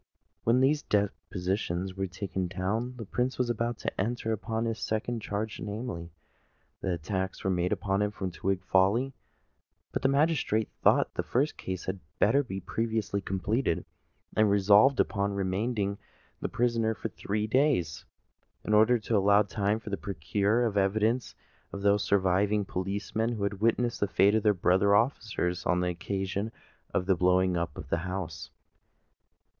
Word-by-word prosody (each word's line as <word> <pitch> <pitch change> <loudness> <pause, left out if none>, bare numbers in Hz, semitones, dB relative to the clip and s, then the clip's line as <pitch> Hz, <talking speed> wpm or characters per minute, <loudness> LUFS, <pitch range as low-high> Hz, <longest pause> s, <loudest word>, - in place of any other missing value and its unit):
When 120 +3 +4
these 145 +3 +3
depositions 95 -2 -1
were 95 0 -2
taken 95 0 -3
down, 100 +8 -2
the 115 - -6
Prince 125 +6 -1
was 125 -1 +1
about 120 0 -2
to - - -3
enter 115 +2 -2
upon 110 +1 -2
his 115 -1 -2
second 110 +2 -2
charge—namely, 105 -2 -4 0.7
the 95 - -1
attack 95 +3 -3
made 90 -1 +1
upon 95 0 0
him 105 0 +1
at 95 -2 -3
Twig 95 +1 -1
Folly: 100 +9 +2 0.8
but - - -2
the 135 - +3
magistrate 140 -6 +1
thought - - +4
the - - -1
first 140 +5 0
case 95 -1 -5
had 95 +1 -3 0.2
better 140 - +4
be 110 -8 -5
previously 110 0 -2
completed, 95 +1 -1 0.5
and 110 -1 +4
resolved 100 +6 +5
upon 100 -1 +1
remanding 100 +1 -1 0.4
the - - -3
prisoner 115 -2 +1
for 110 - -4
three 105 +2 -2
days, 120 - +1 0.6
in 105 - 0
order 110 +3 +5
to 110 0 -2
allow 100 +1 +5
time 105 +1 -1
to 105 -3 -4
procure 100 +7 0
the 100 - +1
evidence 110 +5 +1 0.4
of 100 - -6
those 100 0 +3
surviving 100 +2 +2
policemen 100 +5 -2
who 105 -3 -3
had 100 0 -2
witnessed 120 +1 +1
the 105 - +1
fate 100 +1 +4
of 110 - +3
their 105 -1 +3
brother 95 +3 +3
officers 105 -6 0
on 90 - +2
the 90 - 0
occasion 95 +4 -3 0.4
of 90 - 0
the 95 - +4
blowing 90 +1 +3
up 85 -3 -2
of - - -8
the 85 - +1
house. 85 -4 -5
100 Hz, 155 wpm, -29 LUFS, 95-115 Hz, 0.8 s, resolved